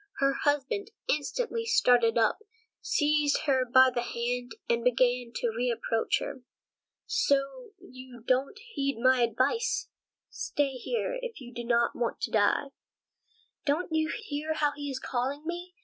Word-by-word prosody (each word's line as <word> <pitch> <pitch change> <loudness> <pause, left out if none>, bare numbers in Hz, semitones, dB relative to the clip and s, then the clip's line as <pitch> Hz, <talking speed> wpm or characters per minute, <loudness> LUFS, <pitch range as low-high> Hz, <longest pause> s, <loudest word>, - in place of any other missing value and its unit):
Her 275 0 +3
husband 290 +10 0 0.2
instantly 460 - -1
started 245 - +4
up, 225 -2 +3 0.4
seized 295 -1 +2
her 260 -3 +2
by 260 0 +7
the 240 - 0
hand, 245 0 -3
and 235 0 +1
began 245 0 +2
to 235 - 0
reproach 230 -2 0
her. 260 - -6 0.6
"So 280 - 0
you 255 -8 -12
don't 265 +9 +1 0.2
heed 275 -3 -1
my 255 +1 +4
advice? 455 - +1 0.4
Stay 285 -2 -1
here, 470 - -3
if - - -6
you 250 -2 -11
don't 235 0 +1
want 240 -1 -2
to - - -2
die." 220 +6 +2 0.9
"Don't 320 +3 -1
you 315 0 +1
hear 310 -6 -3
how 295 -2 +2
he 290 0 -6
is 270 - -3
calling 265 +4 -2
me? 350 +2 -5
270 Hz, 140 wpm, -29 LUFS, 245-310 Hz, 0.9 s, by